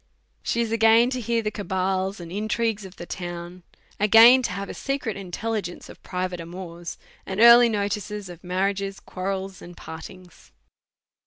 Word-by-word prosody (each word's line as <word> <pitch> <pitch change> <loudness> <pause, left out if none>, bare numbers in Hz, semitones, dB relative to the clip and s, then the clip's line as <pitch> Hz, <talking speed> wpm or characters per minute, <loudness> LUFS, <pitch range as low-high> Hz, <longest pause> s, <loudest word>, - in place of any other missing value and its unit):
She 235 - 0
is 230 -1 -2
again 230 +2 +5
to 255 -1 -2
hear 230 0 0
the 215 - -1
cabals 190 -1 -2
and 170 -1 -9
intrigues 215 +1 -1
of 190 0 -11
the 175 - -8
town, 175 0 -7 0.4
again 225 +5 +8
to 240 - -2
have 195 +1 -5
secret 275 -6 -3
intelligence 195 0 -4
of - - -13
private 180 -1 -4
amours, 170 0 -8 0.3
and 190 +1 -5
early 235 +1 +8
notice 205 -1 -2 0.2
of 175 -1 -11
marriages,, 195 +2 -1
quarrels, 190 0 -5
and 175 0 -12
partings. 175 +2 -11
195 Hz, 150 wpm, -24 LUFS, 180-225 Hz, 0.4 s, again